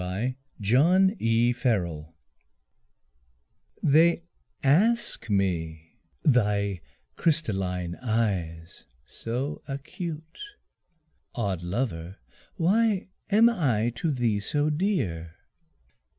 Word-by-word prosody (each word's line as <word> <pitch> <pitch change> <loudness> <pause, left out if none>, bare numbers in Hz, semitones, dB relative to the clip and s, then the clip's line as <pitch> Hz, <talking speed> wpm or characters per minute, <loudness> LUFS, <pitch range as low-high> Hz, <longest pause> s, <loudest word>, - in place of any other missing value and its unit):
Autumn 130 - +1 0.4
Song 85 - -1 1.7
They 165 +3 +4 0.4
ask 215 - +2
me 80 -5 -1 0.3
thy 105 - +2 0.3
crystalline 95 - 0
eyes, 95 -9 -2 0.2
so 125 - -4
acute, 160 +3 -6 1.0
"Odd 100 -8 -2
lover 90 -2 -3 0.4
why 200 +2 +2 0.2
am 215 +3 +6
I 125 - +1
to 165 - -1
thee 120 -7 +1
so 145 +8 0
dear?" 120 - -1
120 Hz, 70 wpm, -27 LUFS, -, 1.7 s, am